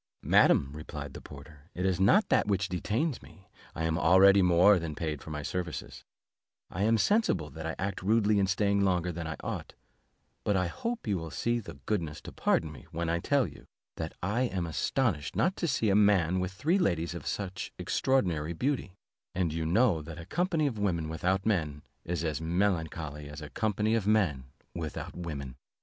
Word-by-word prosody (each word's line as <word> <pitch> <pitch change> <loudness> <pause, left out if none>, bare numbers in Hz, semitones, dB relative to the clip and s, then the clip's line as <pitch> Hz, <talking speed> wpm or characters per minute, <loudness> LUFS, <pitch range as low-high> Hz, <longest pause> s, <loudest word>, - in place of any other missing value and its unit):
"Madam," 70 - +4
replied 75 -2 -7
the - - -9
porter, 75 +2 -13
"it 90 - -2
is 95 -2 +1
not 150 - +5
that - - +3
which 100 -1 +1
detains 115 - -1
me, 95 -2 -17 0.3
I 80 - -3
am 80 +1 0
already 95 +4 +6
more 90 +2 +5
than 80 -2 -5
paid 75 -3 -3
for - - -10
my 75 -1 -4
services; 90 0 -5 0.7
I 90 - -4
am 110 +2 +4
sensible 105 - +1
that 80 0 -6
I 80 - -3
act 100 0 -3
rudely 105 +1 +3
in 95 - +2
staying 100 +1 +2
longer 90 -2 +1
than 85 -1 -5
I 80 - -4
ought, - - -5 0.7
but 105 - +2
I 90 - +1
hope 230 - -4
you 100 -5 0
will 80 0 -6
the 120 +8 -2
goodness 85 -8 -2
to - - -9
pardon 80 - +1
me, 75 - -13
when 85 0 -3
I 85 +1 +1
tell 140 +7 +2
you, - - -11 0.3
that 80 0 -4
I 105 +7 0
am 95 -9 -1
astonished 85 - -1
not 185 +2 +2
to 170 - -1
see 115 -7 +1
a - - +3
man 95 -4 +4
with 90 0 -2
three 160 - +1
ladies 85 - 0
of 85 - -7
such 95 -2 -4
extraordinary 85 - 0
beauty: 125 - -2 0.4
and 85 -4 0
you 80 -1 -2
know 100 -2 +3
that 80 +1 -9
a 85 - -8
company 175 - 0
of 120 -7 -2
women 85 -6 0
without 95 +4 0
men 75 -9 0 0.2
is 85 -1 -2
as 80 -1 -2
melancholy 80 -4 -1
as 75 0 -8
a 75 -2 -9
company 110 0 0
of 110 -3 0
men 90 -12 +2 0.3
without 80 -3 -5
women." 70 -7 -6
90 Hz, 195 wpm, -30 LUFS, 80-105 Hz, 0.7 s, already